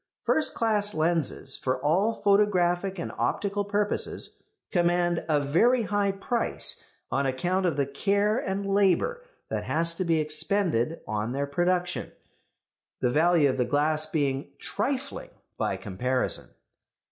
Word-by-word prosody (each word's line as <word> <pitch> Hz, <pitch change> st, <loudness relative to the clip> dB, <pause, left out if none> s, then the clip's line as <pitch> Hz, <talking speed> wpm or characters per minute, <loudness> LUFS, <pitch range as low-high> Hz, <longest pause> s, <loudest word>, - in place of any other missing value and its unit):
First 315 Hz, -, +2 dB
class 210 Hz, -2 st, +1 dB
lenses 155 Hz, -4 st, 0 dB
for 130 Hz, 0 st, -1 dB
all 175 Hz, -, +2 dB
photographic 195 Hz, -2 st, +2 dB
and 170 Hz, -, -4 dB
optical 205 Hz, 0 st, -1 dB
purposes 205 Hz, +1 st, 0 dB, 0.3 s
command 175 Hz, -1 st, +1 dB
a 150 Hz, -2 st, +3 dB
very 225 Hz, -, +3 dB
high 205 Hz, -1 st, 0 dB
price 225 Hz, +5 st, 0 dB, 0.3 s
on 140 Hz, 0 st, +1 dB
account 180 Hz, +8 st, 0 dB
of 160 Hz, -5 st, -1 dB
the 140 Hz, -, +2 dB
care 200 Hz, -, +1 dB
and 195 Hz, -2 st, -3 dB
labour 200 Hz, -, +2 dB, 0.3 s
that -, -, -3 dB
has 165 Hz, +2 st, +1 dB
to 185 Hz, -, -2 dB
be 165 Hz, -2 st, +2 dB
expended 155 Hz, -, 0 dB
on 110 Hz, +3 st, -2 dB
their 140 Hz, +1 st, -1 dB
production; 175 Hz, +4 st, -1 dB, 0.9 s
the 125 Hz, -, +1 dB
value 160 Hz, +1 st, +4 dB
of 130 Hz, -, -1 dB
the 125 Hz, -, +2 dB
glass 155 Hz, +4 st, +1 dB
being 140 Hz, -3 st, -2 dB
trifling 280 Hz, -, -3 dB, 0.3 s
by -, -, -1 dB
comparison. 125 Hz, +6 st, -1 dB
175 Hz, 135 wpm, -27 LUFS, 145-200 Hz, 0.9 s, value